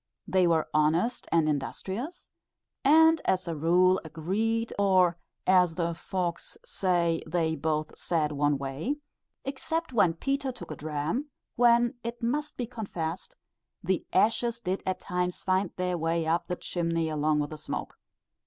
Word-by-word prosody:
They 185 Hz, 0 st, +3 dB
were 165 Hz, -2 st, +2 dB
honest 160 Hz, +10 st, +1 dB
and 165 Hz, -2 st, +3 dB
industrious, 190 Hz, -, -4 dB, 0.5 s
and, 320 Hz, +3 st, +6 dB
as 185 Hz, -1 st, +1 dB
a 165 Hz, -, -2 dB
rule, 180 Hz, +4 st, +4 dB
agreed, 210 Hz, +9 st, -1 dB
or 185 Hz, -3 st, +4 dB, 0.3 s
as 180 Hz, -3 st, +4 dB
the 170 Hz, -1 st, 0 dB
folks 175 Hz, -, -4 dB
say, 175 Hz, -, +1 dB
they 160 Hz, -1 st, 0 dB
both 155 Hz, -1 st, -2 dB
"said 155 Hz, -3 st, 0 dB
one 145 Hz, 0 st, +1 dB
way," 140 Hz, -, -3 dB, 0.5 s
except 300 Hz, +3 st, -3 dB
when 180 Hz, -8 st, +4 dB
Peter 275 Hz, +7 st, -1 dB
took 245 Hz, -9 st, -10 dB
a -, -, -4 dB
dram, 155 Hz, -, -3 dB, 0.3 s
when, 235 Hz, 0 st, +4 dB
it 235 Hz, +1 st, -5 dB
must 295 Hz, +6 st, -1 dB
be 245 Hz, -, -1 dB
confessed, 190 Hz, -8 st, -5 dB, 0.5 s
the 185 Hz, 0 st, 0 dB
ashes 230 Hz, +3 st, +2 dB
did 190 Hz, -4 st, -2 dB
at 185 Hz, -, -1 dB
times 180 Hz, 0 st, -2 dB
find 185 Hz, 0 st, +1 dB
their 180 Hz, -1 st, -1 dB
way 165 Hz, +1 st, 0 dB
up 165 Hz, +2 st, 0 dB
the 180 Hz, -, -2 dB
chimney 165 Hz, -2 st, -1 dB
along 155 Hz, 0 st, +1 dB
with 145 Hz, 0 st, -2 dB
the 155 Hz, -, -6 dB
smoke. -, -, -5 dB
180 Hz, 150 wpm, -28 LUFS, 160-230 Hz, 0.5 s, and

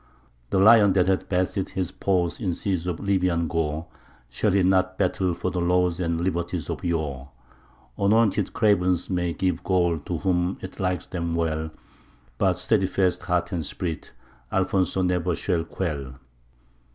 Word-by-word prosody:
The -, -, 0 dB
LION 105 Hz, -1 st, +7 dB
that 90 Hz, -2 st, +3 dB
hath 95 Hz, 0 st, 0 dB
bathed 95 Hz, +1 st, 0 dB
his 90 Hz, -2 st, -2 dB
paws 90 Hz, -3 st, 0 dB
in 95 Hz, -7 st, -1 dB
seas 90 Hz, -4 st, -2 dB
of 85 Hz, -3 st, -2 dB
Lybian 90 Hz, -4 st, +1 dB
gore; 80 Hz, 0 st, -2 dB, 0.5 s
Shall -, -, 0 dB
he 95 Hz, -1 st, +3 dB
not 95 Hz, 0 st, +2 dB
battle 95 Hz, -2 st, 0 dB
for 90 Hz, -, -2 dB
the 90 Hz, -, -2 dB
laws 90 Hz, 0 st, +2 dB
and 85 Hz, -2 st, -1 dB
liberties 85 Hz, -2 st, -2 dB
of -, -, -6 dB
yore? 75 Hz, -6 st, -2 dB, 0.7 s
Anointed 105 Hz, 0 st, +2 dB
cravens 95 Hz, -6 st, +2 dB
may 90 Hz, -1 st, 0 dB
give 90 Hz, -1 st, -1 dB
gold 85 Hz, -5 st, +1 dB
to 85 Hz, -, -2 dB
whom 90 Hz, +1 st, 0 dB
it 95 Hz, -, -9 dB
likes 90 Hz, -3 st, -1 dB
them 85 Hz, -2 st, -3 dB
well, 80 Hz, -1 st, -1 dB, 0.7 s
But 95 Hz, -2 st, +2 dB
steadfast 95 Hz, -2 st, +1 dB
heart 90 Hz, 0 st, 0 dB
and 85 Hz, -4 st, -2 dB
spirit, 80 Hz, 0 st, -4 dB, 0.4 s
Alfonso 95 Hz, 0 st, +1 dB
ne'er 90 Hz, -1 st, 0 dB
shall 85 Hz, -4 st, -1 dB
quell. 70 Hz, -7 st, -4 dB
90 Hz, 150 wpm, -25 LUFS, 85-95 Hz, 0.7 s, LION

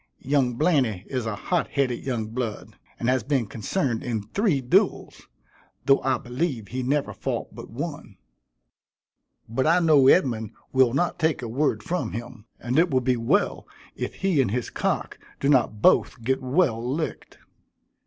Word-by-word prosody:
Young 135 Hz, -3 st, +1 dB
Blainey 130 Hz, -, +1 dB
is 125 Hz, -4 st, -3 dB
a 110 Hz, -, -2 dB
hot 175 Hz, -, -1 dB
headed 130 Hz, -4 st, -1 dB
young 115 Hz, -5 st, -2 dB
blood, 115 Hz, -2 st, -5 dB, 0.2 s
and 120 Hz, -, -2 dB
has 130 Hz, 0 st, +2 dB
been 130 Hz, 0 st, 0 dB
concerned 115 Hz, -, -2 dB
in 115 Hz, -4 st, -2 dB
three 165 Hz, -, 0 dB
duels, 125 Hz, -1 st, 0 dB, 0.6 s
though 135 Hz, 0 st, +4 dB
I 130 Hz, -1 st, +1 dB
believe 125 Hz, -, -3 dB
he 130 Hz, +1 st, -3 dB
never 140 Hz, +3 st, 0 dB
fought -, -, -4 dB
but -, -, -10 dB
one; -, -, -6 dB, 1.3 s
but 130 Hz, +6 st, 0 dB
I 165 Hz, +2 st, +5 dB
know 155 Hz, -6 st, +5 dB
Edmund 115 Hz, -, +3 dB, 0.2 s
will 130 Hz, -2 st, +4 dB
not 175 Hz, +4 st, 0 dB
take 160 Hz, -5 st, +1 dB
a -, -, -3 dB
word 140 Hz, +6 st, 0 dB
from 175 Hz, -, -2 dB
him, 115 Hz, 0 st, -7 dB
and 125 Hz, +5 st, 0 dB
it 175 Hz, +2 st, +4 dB
will 130 Hz, -, +2 dB
be 125 Hz, 0 st, +1 dB
well 115 Hz, -1 st, 0 dB, 0.3 s
if -, -, -4 dB
he 185 Hz, -7 st, +2 dB
and 125 Hz, -, 0 dB
his 120 Hz, +3 st, -2 dB
cock -, -, -2 dB, 0.2 s
do 140 Hz, -, 0 dB
not 125 Hz, -6 st, +2 dB
both 115 Hz, -, +3 dB
get 130 Hz, +3 st, 0 dB
well 130 Hz, -3 st, +1 dB
licked." 140 Hz, +6 st, -4 dB
130 Hz, 165 wpm, -25 LUFS, 115-145 Hz, 1.3 s, I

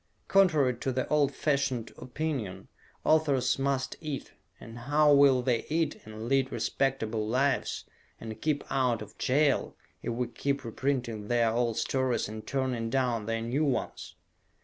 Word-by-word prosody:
Contrary 155 Hz, -10 st, +4 dB
to 130 Hz, +3 st, -2 dB
the 130 Hz, 0 st, -1 dB
old 145 Hz, -2 st, +3 dB
fashioned 135 Hz, -6 st, -1 dB
opinion, 130 Hz, -7 st, -4 dB, 0.4 s
authors 145 Hz, -5 st, +3 dB
must 135 Hz, -1 st, -1 dB
eat 150 Hz, -4 st, -5 dB, 0.3 s
and 115 Hz, +1 st, -10 dB
how 150 Hz, 0 st, +5 dB
will 140 Hz, -3 st, +5 dB
they 120 Hz, -2 st, +1 dB
eat, 165 Hz, +1 st, 0 dB
and 110 Hz, +1 st, -7 dB
lead 135 Hz, 0 st, +2 dB
respectable 110 Hz, -5 st, -1 dB
lives, 135 Hz, +5 st, 0 dB, 0.3 s
and 110 Hz, -1 st, -8 dB
keep 150 Hz, -2 st, 0 dB
out 125 Hz, -5 st, +1 dB
of 105 Hz, -, -14 dB
jail, 140 Hz, +1 st, +2 dB, 0.3 s
if -, -, -3 dB
we 120 Hz, +2 st, -1 dB
keep 140 Hz, +3 st, -2 dB
reprinting 115 Hz, -3 st, -2 dB
their 120 Hz, -1 st, +2 dB
old 115 Hz, -1 st, 0 dB
stories 130 Hz, -2 st, 0 dB
and 110 Hz, +1 st, -8 dB
turning 130 Hz, -4 st, -1 dB
down 120 Hz, -4 st, 0 dB
their 115 Hz, 0 st, -1 dB
new 125 Hz, +7 st, 0 dB
ones? 140 Hz, -4 st, -2 dB
130 Hz, 150 wpm, -29 LUFS, 115-140 Hz, 0.4 s, how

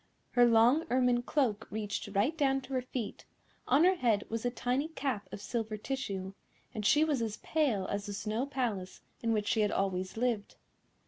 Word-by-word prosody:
Her 245 Hz, -1 st, +5 dB
long 240 Hz, +8 st, +5 dB
ermine 250 Hz, -1 st, +3 dB
cloak 240 Hz, -5 st, 0 dB
reached 210 Hz, -1 st, -3 dB
right 230 Hz, +11 st, +2 dB
down 270 Hz, -3 st, +2 dB
to 265 Hz, +1 st, -9 dB
her 255 Hz, -, +1 dB
feet, 245 Hz, -3 st, -5 dB, 0.4 s
on 280 Hz, +5 st, +5 dB
her 370 Hz, +2 st, +6 dB
head 230 Hz, -, +1 dB
was 225 Hz, 0 st, -2 dB
a 245 Hz, -, +1 dB
tiny 250 Hz, +4 st, -1 dB
cap 270 Hz, -10 st, -3 dB
of -, -, -6 dB
silver 220 Hz, -1 st, -3 dB
tissue, 200 Hz, -6 st, -4 dB, 0.4 s
and 215 Hz, -, -4 dB
she 295 Hz, +9 st, +5 dB
was 295 Hz, -6 st, +1 dB
as 220 Hz, -2 st, -2 dB
pale 265 Hz, -12 st, +1 dB
as 200 Hz, +1 st, -3 dB
the 205 Hz, -, -4 dB
Snow 215 Hz, +6 st, -2 dB
Palace 230 Hz, -9 st, -3 dB, 0.2 s
in 230 Hz, -, 0 dB
which 210 Hz, -2 st, 0 dB
she 220 Hz, -, +2 dB
had 210 Hz, -1 st, +2 dB
always 190 Hz, 0 st, -1 dB
lived. 230 Hz, -3 st, -1 dB
235 Hz, 190 wpm, -32 LUFS, 210-265 Hz, 0.4 s, her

